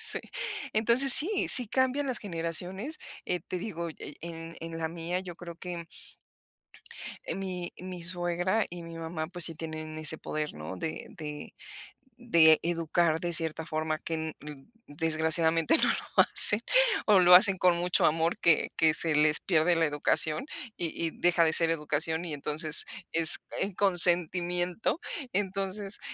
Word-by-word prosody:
sí. - - 0 0.5
Entonces 235 +5 +6
sí, 375 - +7
sí 250 -2 +7
cambian 260 +4 -1
las 255 - -3
generaciones. 185 - -6 0.3
Eh, 180 - -3
te 180 - -5
digo, 170 -3 -7
e - - -11
en 165 0 -10
en 165 0 -8
la 160 -1 -4
mía, 170 +2 -6
yo 180 -2 -10
creo 170 -1 -11
que 175 -2 -9 1.4
eh, - - -5
mi 185 -2 -7
mi 180 -2 -9
suegra 175 +4 -2
y 175 0 -10
mi 165 0 -11
mamá, 160 -1 -6
pues, 175 -1 +2
sí 165 - -1
tienen 155 0 -8
ese 155 0 +3
poder, 155 -1 -6
¿no?, 80 +4 -9
de 160 - -7
de 150 -2 -10 0.7
de 165 -10 +4
educar 165 -1 -1
de 175 +1 -4
cierta 160 -1 -1
forma, 155 0 -4
que 165 - -5
n 160 0 -6
d 145 -2 -12 0.2
desgraciadamente 160 - 0
no - - +2
lo - - 0
hacen, 210 - +7 0.5
o 205 -3 +3
lo 180 0 +6
hacen 190 +1 +5
con 180 -1 +2
mucho 175 +1 0
amor, 165 +2 -1
que 165 -2 +1
que 160 -1 +2
se 160 -2 0
les 150 0 +2
pierde 170 -1 0
la 165 0 0
educación 150 - +2 0.3
y 170 - -3 0.2
y 165 - -3
deja 175 0 0
de 160 -1 0
ser 165 0 +4
educación 160 +1 -3
y 165 - -7
entonces 150 +2 -4 0.3
es 165 -1 +7 0.2
en 200 - -3
consentimiento. 175 - +2 0.3
Entonces, 195 +1 -4
170 Hz, 160 wpm, -27 LUFS, 160-180 Hz, 1.4 s, sí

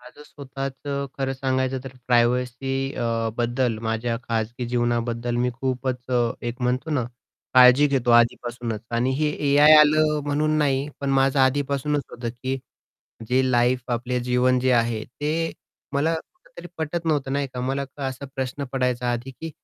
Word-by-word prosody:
माझं 125 +4 -14
स्वतःचं 140 0 -5
खरं 135 -1 -1
सांगायचं 130 0 -1
तर - - -5 0.2
प्रायव्हसी 125 +2 +1
अ, 115 -2 -1
बद्दल 120 -1 0
माझ्या 115 +1 -1
खाजगी 115 +2 -2
जीवनाबद्दल 120 0 -1
मी 125 +1 +1
खूपच 130 -1 -3 0.4
एक 120 +2 -7
म्हणतो 125 +5 -1
ना 135 -5 0 0.5
काळजी 130 +3 +7
घेतो 135 -4 0
आधीपासूनच 120 -1 +1
आणि 120 +2 +1
हे 150 +2 +1 0.2
एआय 145 +2 +7
आलं 150 0 +4
म्हणून 155 +2 +1
नाही 140 -1 +1
पण 140 -1 -1
माझं 135 0 +2
आधीपासूनच 140 +2 +1
होतं 120 0 -5
की 130 +3 -4 0.7
जे 130 +1 +3
लाईफ 125 +1 +3
आपले 125 +1 -1
जीवन 125 +1 +2
जे 130 +1 +2
आहे 115 -2 +1
ते 155 +5 -2 0.4
मला 155 +4 +1
कुठेतरी 370 - -10
पटत 160 +2 -3
नव्हतं 145 -4 0
नाही 140 0 0
का 125 - -3
मला 135 +2 -1 0.2
असा 130 +1 -7
प्रश्न 135 +1 -3
पडायचा 125 -2 0
आधी 120 +2 -4
की 160 +5 -8
130 Hz, 150 wpm, -24 LUFS, 120-140 Hz, 0.7 s, काळजी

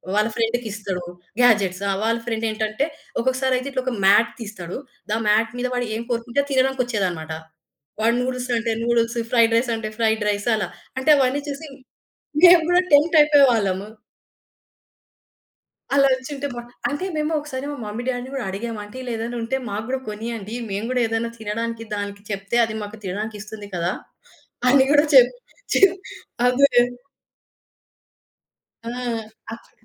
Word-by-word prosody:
వాళ్ళ 215 +1 +3
ఫ్రెండ్‌కిస్తాడు. 215 -5 -2 0.4
గ్యాడ్జెట్స్. 205 -6 +4
ఆ! - - +2
వాళ్ళ 230 +1 +2
ఫ్రెండ్ 225 -1 -2
ఏంటంటే, 215 +4 -1 0.3
ఒక్కొక్కసారి 260 +1 +1
అయితే 255 +2 -4
ఇట్లా 260 - -1
ఒక 255 - -1
మ్యాట్ 210 +4 +5
తీస్తాడు. 200 -6 -6 0.3
ద 215 - +2
మ్యాట్ 220 +2 +3
మీద 250 - 0
వాడు 245 -1 -1
ఏం 225 - -3
కోరుకుంటే 235 +3 0
తినడానికొచ్చేదనమాట. 240 -12 0 0.7
వాడు 230 +2 +3
నూడిల్స్ 250 0 -3
అంటే 230 0 -1
నూడిల్స్, 235 0 +1 0.2
ఫ్రైడ్ 230 -1 +5
రైస్ 240 +1 +1
అంటే 220 -1 -4
ఫ్రైడ్ 220 -1 +1
రైస్ 205 +2 -2
అలా. 210 -4 -2 0.3
అంటే 260 +3 0
అవన్నీ 270 +1 +2
చూసి 285 +3 -5 0.8
మేము 350 -1 +9
కూడా 355 +1 +5
టెంప్ట్ 300 +3 +5
అయిపోయేవాళ్ళము. 235 -10 +4 2.1
అలా 275 -1 +6
వచ్చుంటే 275 +2 -4
బా 240 - -5 0.3
అంటే 290 +6 -3
మేము 305 +1 0
ఒకసారి 280 -2 -6
మా - - -5
మమ్మీ 215 +3 -5
డ్యాడీని 255 0 -3
కూడా 270 -3 -3
అడిగాము. 220 +3 -4
అంటే 205 +3 -13
ఇలా 250 -1 -5
ఏదైనా 235 +2 -4
ఉంటే 250 +4 -1
మాకు 205 +2 -4
గూడా 265 0 -1
కొనియండి. 220 0 -5 0.2
మేము 200 +3 -2
గూడా 255 -1 +1
ఏదైనా 225 +1 -1
తినడానికి 225 +1 -4
దానికి 205 0 -5
చెప్తే 195 +3 -2
అది 220 - -6
మాకు 205 +2 -8
తినడానికిస్తుంది 210 +2 -6
కదా! 175 +1 0 0.8
అని 270 +1 +6
గూడా 295 +1 +5
చెప్ 250 -2 +8 0.4
చెప్ 385 -1 +6 0.5
అదే. 270 +3 +4 2.2
ఆ! - - -3 0.6
ఆ - - -3
చూ - - -27
230 Hz, 145 wpm, -22 LUFS, 210-260 Hz, 2.2 s, మేము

